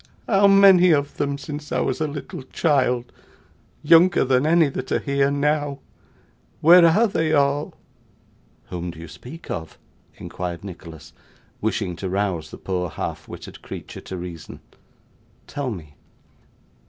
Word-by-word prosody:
How 200 Hz, -1 st, +4 dB
many 195 Hz, -2 st, +7 dB
of 145 Hz, -3 st, +1 dB
them 140 Hz, 0 st, -1 dB
since 150 Hz, +1 st, -8 dB
I -, -, 0 dB
was -, -, -1 dB
a 155 Hz, -, +1 dB
little 145 Hz, -1 st, -7 dB
child, 130 Hz, -4 st, 0 dB, 0.7 s
younger 165 Hz, +3 st, +5 dB
than 130 Hz, +2 st, +2 dB
any 165 Hz, -1 st, +4 dB
that 130 Hz, -1 st, -6 dB
are -, -, +3 dB
here 140 Hz, 0 st, +1 dB
now! 145 Hz, 0 st, 0 dB, 0.8 s
Where 175 Hz, +3 st, +7 dB
are 205 Hz, +8 st, +4 dB
they 160 Hz, -7 st, 0 dB
all!' 145 Hz, 0 st, +1 dB, 1.0 s
'Whom 90 Hz, 0 st, -4 dB
do 85 Hz, -, -9 dB
you 85 Hz, -, -9 dB
speak 125 Hz, -, -11 dB
of?' 80 Hz, -1 st, -6 dB, 0.4 s
inquired 90 Hz, -1 st, -6 dB
Nicholas, 80 Hz, -4 st, -11 dB, 0.5 s
wishing 100 Hz, -4 st, -1 dB
to 95 Hz, -, -4 dB
rouse 95 Hz, -5 st, -2 dB
the -, -, -10 dB
poor 90 Hz, -2 st, -3 dB
half -, -, -6 dB
witted -, -, -10 dB
creature -, -, -9 dB
to 95 Hz, -, -7 dB
reason. 85 Hz, -2 st, -9 dB, 0.8 s
'Tell 145 Hz, -3 st, -4 dB
me. 80 Hz, -10 st, -8 dB
140 Hz, 140 wpm, -22 LUFS, -, 1.0 s, many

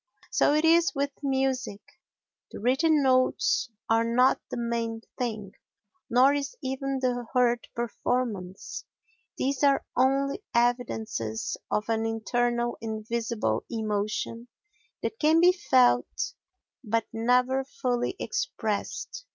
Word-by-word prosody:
So 290 Hz, -, +3 dB
it 305 Hz, +1 st, +2 dB
is 335 Hz, 0 st, +4 dB
with 280 Hz, 0 st, 0 dB
music, 265 Hz, -6 st, -1 dB, 0.7 s
the -, -, -9 dB
written 280 Hz, +6 st, +3 dB
notes 255 Hz, -2 st, +2 dB, 0.2 s
are 225 Hz, 0 st, +3 dB
not 245 Hz, +3 st, +3 dB
the -, -, -4 dB
main 230 Hz, -1 st, -2 dB
thing, 220 Hz, -5 st, -3 dB, 0.6 s
nor 255 Hz, +4 st, +5 dB
is 285 Hz, -, -3 dB
even 270 Hz, +1 st, -2 dB
the 245 Hz, -2 st, -1 dB
heard 240 Hz, -1 st, +2 dB
performance; 230 Hz, -5 st, -3 dB, 0.5 s
these 275 Hz, +1 st, -1 dB
are 280 Hz, -1 st, +4 dB
only 275 Hz, +6 st, +2 dB
evidences 225 Hz, -, 0 dB
of 210 Hz, -, -1 dB
an 225 Hz, 0 st, 0 dB
internal 240 Hz, +1 st, -1 dB
invisible 220 Hz, -, -2 dB
emotion 215 Hz, +1 st, -2 dB, 0.6 s
that 445 Hz, -, -3 dB
can 315 Hz, +2 st, +4 dB
be 355 Hz, +2 st, +7 dB
felt 125 Hz, -, +2 dB, 0.5 s
but 225 Hz, 0 st, 0 dB
never 250 Hz, +3 st, +2 dB
fully 250 Hz, +2 st, -2 dB
expressed. -, -, -3 dB
245 Hz, 110 wpm, -27 LUFS, 225-270 Hz, 0.7 s, be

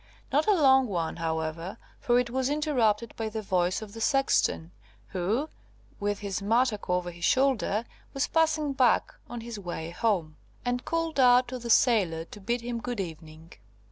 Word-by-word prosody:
Not 295 Hz, +6 st, +2 dB
a 420 Hz, -, +5 dB
long 265 Hz, -3 st, +5 dB
one, 170 Hz, -6 st, -2 dB
however, 160 Hz, +2 st, -3 dB, 0.2 s
for 240 Hz, 0 st, +2 dB
it 240 Hz, -1 st, -2 dB
was 260 Hz, +1 st, 0 dB
interrupted 245 Hz, -8 st, +1 dB
by 225 Hz, -1 st, -3 dB
the 215 Hz, 0 st, -5 dB
voice 185 Hz, +1 st, 0 dB
of 205 Hz, -2 st, -11 dB
the 225 Hz, -, -8 dB
sexton, 225 Hz, -, +1 dB, 0.4 s
who, 205 Hz, -, -1 dB, 0.5 s
with 205 Hz, 0 st, -1 dB
his 200 Hz, -1 st, -3 dB
mattock 225 Hz, 0 st, +1 dB
over 180 Hz, 0 st, 0 dB
his 170 Hz, 0 st, -12 dB
shoulder, 245 Hz, -1 st, +2 dB, 0.3 s
was 275 Hz, -, 0 dB
passing 310 Hz, -3 st, +1 dB
back 260 Hz, -2 st, +2 dB, 0.2 s
on 240 Hz, -1 st, -6 dB
his 230 Hz, -2 st, -7 dB
way 170 Hz, -3 st, -5 dB
home, 175 Hz, -7 st, -1 dB, 0.3 s
and 245 Hz, +1 st, -1 dB
called 330 Hz, -3 st, -1 dB
out 250 Hz, -1 st, +6 dB
to 255 Hz, 0 st, -5 dB
the 235 Hz, 0 st, -7 dB
sailor 195 Hz, -10 st, +3 dB
to 205 Hz, -, -12 dB
bid 235 Hz, +4 st, -1 dB
him 235 Hz, 0 st, -4 dB
good 245 Hz, -2 st, -4 dB
evening. 160 Hz, -2 st, -8 dB
225 Hz, 170 wpm, -28 LUFS, 180-255 Hz, 0.5 s, out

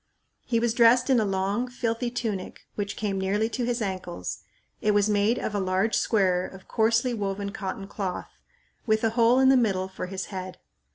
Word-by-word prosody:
He 230 Hz, -2 st, +1 dB
was 235 Hz, -1 st, +1 dB
dressed 240 Hz, +3 st, +5 dB
in 255 Hz, -, +5 dB
a 220 Hz, -, +2 dB
long, 195 Hz, +5 st, 0 dB
filthy 240 Hz, -1 st, -2 dB
tunic 220 Hz, -6 st, -4 dB
which 200 Hz, -1 st, -3 dB
came 195 Hz, -3 st, -2 dB
nearly 205 Hz, +4 st, +1 dB
to 245 Hz, 0 st, -2 dB
his 240 Hz, -1 st, -1 dB
ankles. 185 Hz, -, -4 dB, 0.4 s
It 210 Hz, -1 st, +2 dB
was 205 Hz, 0 st, +4 dB
made 210 Hz, +3 st, +2 dB
of 215 Hz, -, -3 dB
a 205 Hz, -, 0 dB
large 190 Hz, +3 st, +1 dB
square 185 Hz, -4 st, +2 dB
of 190 Hz, -1 st, -13 dB
coarsely 230 Hz, +2 st, +2 dB
woven 200 Hz, -2 st, -3 dB
cotton 195 Hz, -1 st, -5 dB
cloth, 195 Hz, -3 st, -5 dB, 0.5 s
with 220 Hz, 0 st, +2 dB
a 225 Hz, -, +2 dB
hole 235 Hz, +1 st, +4 dB
in 265 Hz, 0 st, +5 dB
the 270 Hz, -, +6 dB
middle 195 Hz, -6 st, +1 dB
for 190 Hz, -1 st, -6 dB
his 190 Hz, 0 st, -4 dB
head. 185 Hz, -1 st, -6 dB
210 Hz, 190 wpm, -26 LUFS, 190-230 Hz, 0.5 s, the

